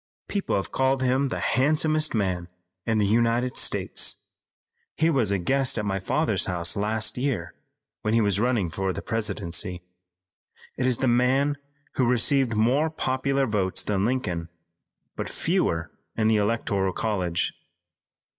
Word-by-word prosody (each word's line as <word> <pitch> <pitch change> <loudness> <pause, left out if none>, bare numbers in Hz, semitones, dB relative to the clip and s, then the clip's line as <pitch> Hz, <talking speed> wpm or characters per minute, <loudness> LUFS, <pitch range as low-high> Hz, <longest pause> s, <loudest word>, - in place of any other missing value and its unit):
People 200 -1 -1
have 95 - -2
called 130 0 +1
him 130 +2 +2
the - - -3
handsomest 155 +3 +2
man 95 -5 -1 0.4
in 110 -1 +2
the 105 - +2
United 115 +3 +1
States. - - +2 0.8
He 160 +1 +3
was 125 -9 +2
a 100 - +2
guest 130 +8 +1
at 105 - -1
my 95 -1 -1
father's 95 - +1
house 85 0 0
last 105 +2 0
year 115 - -2 0.5
when 110 +1 0
he - - +4
was 100 -3 +2
running 115 -7 +1
for 95 +2 -2
the - - -6
presidency. 90 -5 -3 0.9
It 130 - 0
is 125 -3 +2
the 130 - 0
man 130 +4 +2 0.4
who 130 - +3
received 125 0 +2
more 130 +9 +2
popular 135 -2 0
votes 100 -5 0
than 100 -2 0
Lincoln, 90 -9 -1 0.7
but - - -4
fewer 80 0 -1 0.3
in 110 - +2
the 110 - +3
Electoral 100 -3 0
College." 90 -6 -1
115 Hz, 145 wpm, -25 LUFS, 95-130 Hz, 0.9 s, he